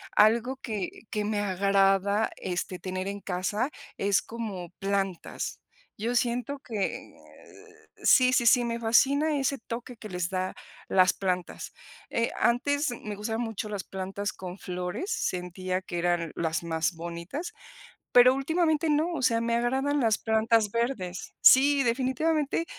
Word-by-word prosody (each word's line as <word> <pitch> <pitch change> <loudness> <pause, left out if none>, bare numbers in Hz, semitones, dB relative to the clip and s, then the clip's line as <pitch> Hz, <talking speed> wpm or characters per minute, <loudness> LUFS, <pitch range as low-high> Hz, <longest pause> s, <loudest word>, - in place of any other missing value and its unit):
algo 235 +5 +4
que 215 -8 -4 0.2
que 210 -1 -2
me 210 0 -1
agrada, 195 +1 +2
este, 180 0 -4
tener 185 0 -4
en 200 +1 -4
casa 195 +7 -1 0.3
es 200 0 +2
como 210 -7 -6
plantas, 195 -2 -2 0.4
yo 230 +4 -2
siento 245 +4 0
que 220 -7 -4 0.9
sí, 255 -1 +6
sí, 240 - +3
sí, 245 +2 +6
me 235 0 -2
fascina 280 +7 +3
ese 275 +1 0
toque 235 +2 -7
que 215 -1 -10
les 180 -2 -2
da 185 0 -2 0.3
las 185 -1 +4
plantas, 180 -2 -3 0.4
eh, 230 0 0
antes 285 +5 +2
me 215 -3 -6
gustaban 220 +3 -3
mucho 225 -2 -4
las 205 -2 -4
plantas 195 +2 -4
con 185 0 -8
flores, 180 - -4
sentía 185 - -2
que 175 -2 -5
eran 175 -2 0
las 165 0 -1
más 165 0 -1
bonitas, 170 - -6 0.6
pero 250 +1 +8
últimamente 315 +2 +1
no, 310 +4 +1
o 305 - -3
sea, 235 -3 +3
me 230 0 0
agradan 265 +4 +1
las 225 -3 +3
plantas 220 -1 +2
verdes 225 -7 -2
Sí, 280 +1 +7
definitivamente 275 +6 0
220 Hz, 140 wpm, -28 LUFS, 185-255 Hz, 0.9 s, pero